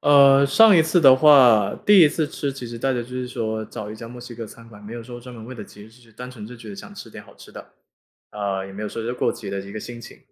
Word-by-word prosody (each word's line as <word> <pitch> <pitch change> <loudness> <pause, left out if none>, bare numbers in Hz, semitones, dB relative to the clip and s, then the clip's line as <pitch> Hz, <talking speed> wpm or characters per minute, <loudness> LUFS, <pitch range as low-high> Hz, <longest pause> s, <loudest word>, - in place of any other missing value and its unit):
呃 140 -1 +5
上 210 +8 +5
一 165 - +5
次 160 +3 +1
的 135 -4 +7
话， 130 -7 +5
第 205 -2 +6
1 155 - +7
次 155 0 -2
吃， 145 -2 -5
其 130 -3 -9
实 115 0 -9
大 135 +3 -1
家 125 - -2
就 120 - -8
是 125 0 -5
说 110 -3 -4
找 105 0 -9
一 110 - -9
家 115 - -10
墨 120 0 -11
西 120 -1 -11
哥 115 -1 -8
餐 115 +2 -15
馆， 105 -2 -16
没 105 +2 -11
有 120 - -8
说 120 +1 -11
专 125 0 -12
门 110 -1 -11
为 130 +2 -10
了 110 - -9
节 105 - -16
日 105 - -15
去， 115 -1 -22
单 125 +3 -10
纯 110 -4 -11
就 125 +1 -12
觉 115 -2 -13
得 100 - -9
想 - - -12
吃 - - -11
点 - - -11
好 - - -19
吃 - - -16
的。 - - -13 0.6
啊， 100 -2 -4
也 95 - -11
没 105 +2 -8
有 105 - -4
说 115 - -7
是 120 +2 -4
过 - - -1
节 - - -10
的 100 - -4
一 100 +1 -11
个 110 - -7
心 120 -1 -9
情。 - - -13
120 Hz, 335 characters per minute, -21 LUFS, 110-135 Hz, 0.6 s, 的